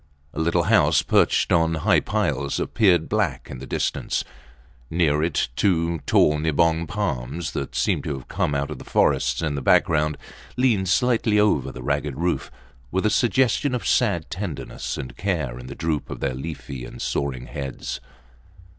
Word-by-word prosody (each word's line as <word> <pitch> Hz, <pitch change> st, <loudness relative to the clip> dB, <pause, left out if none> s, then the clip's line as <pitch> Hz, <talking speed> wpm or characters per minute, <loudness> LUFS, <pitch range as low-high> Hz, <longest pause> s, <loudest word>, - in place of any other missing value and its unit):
A -, -, -5 dB
little 80 Hz, +1 st, +2 dB
house, -, -, +4 dB
perched -, -, +2 dB
on 80 Hz, -1 st, +3 dB
high 80 Hz, -, +3 dB
piles, 70 Hz, -1 st, -1 dB
appeared 90 Hz, -7 st, +2 dB
black 95 Hz, -12 st, -1 dB
in 65 Hz, -, -7 dB
the 65 Hz, -, -8 dB
distance. -, -, -1 dB, 0.7 s
Near 80 Hz, -3 st, +2 dB
it, 80 Hz, -5 st, 0 dB
two 85 Hz, -3 st, +1 dB
tall 75 Hz, 0 st, +4 dB
nibong 80 Hz, +2 st, +2 dB
palms, 80 Hz, -, -3 dB
that 70 Hz, -, -5 dB
seemed -, -, 0 dB
to 75 Hz, -, -2 dB
have 65 Hz, -, -11 dB
come 75 Hz, -, -1 dB
out 70 Hz, +1 st, -1 dB
of -, -, -6 dB
the -, -, -9 dB
forests -, -, +1 dB
in 75 Hz, -2 st, 0 dB
the 70 Hz, -, -3 dB
background, 75 Hz, +3 st, +3 dB, 0.4 s
leaned 110 Hz, -8 st, +2 dB
slightly 115 Hz, -1 st, +2 dB
over 105 Hz, -10 st, +2 dB
the 65 Hz, -, -9 dB
ragged 70 Hz, +1 st, -1 dB
roof, 85 Hz, +2 st, -1 dB, 0.4 s
with 95 Hz, +6 st, -1 dB
a 105 Hz, -, +3 dB
suggestion 130 Hz, +2 st, +2 dB
of 115 Hz, -6 st, -4 dB
sad 85 Hz, -2 st, +1 dB
tenderness 90 Hz, -5 st, -5 dB
and 65 Hz, -2 st, -6 dB
care -, -, -2 dB
in 60 Hz, -, -9 dB
the 70 Hz, -, -7 dB
droop 80 Hz, -3 st, -2 dB
of -, -, -6 dB
their 70 Hz, -2 st, -1 dB
leafy 70 Hz, -2 st, -6 dB
and -, -, -9 dB
soaring 65 Hz, -3 st, -2 dB
heads. 70 Hz, -2 st, -5 dB
80 Hz, 170 wpm, -23 LUFS, 70-90 Hz, 0.7 s, house